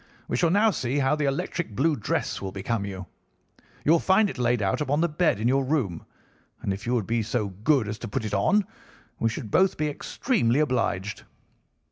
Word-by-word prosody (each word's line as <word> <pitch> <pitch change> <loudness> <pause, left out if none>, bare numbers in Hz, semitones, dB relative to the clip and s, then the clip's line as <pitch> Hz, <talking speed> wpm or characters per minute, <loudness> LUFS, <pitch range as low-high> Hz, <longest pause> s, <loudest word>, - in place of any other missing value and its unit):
We - - -2
shall 165 +7 +3
now 210 +5 +4
see 130 -6 -2
how 140 +1 +2
the 150 -1 -1
electric 145 - -2
blue 155 +6 +2
dress 110 - -2
will 95 -1 -4
become 100 +2 -2
you. 95 -2 -6 0.8
You 150 - +4
will 170 - +6
find 195 +3 +3
it - - -10
laid 120 0 +2
out 95 +8 0
upon 145 0 +1
the 170 - +3
bed 155 - +1
in 110 - +1
your 135 +2 +3
room, 130 - -1 0.5
and 100 - -2
if 100 +4 -7
you 125 - +1
would 110 -5 0
be 115 +2 0
so 110 -1 -1
good 110 +5 +1
as 105 +2 -5
to - - -6
put 110 +2 -3
it 105 - -4
on 190 - +3 0.5
we 115 - +2
should 110 -1 -6
both 190 - +3
be 150 0 0
extremely 140 - 0
obliged. 115 -8 -1
125 Hz, 210 wpm, -26 LUFS, 105-155 Hz, 0.8 s, will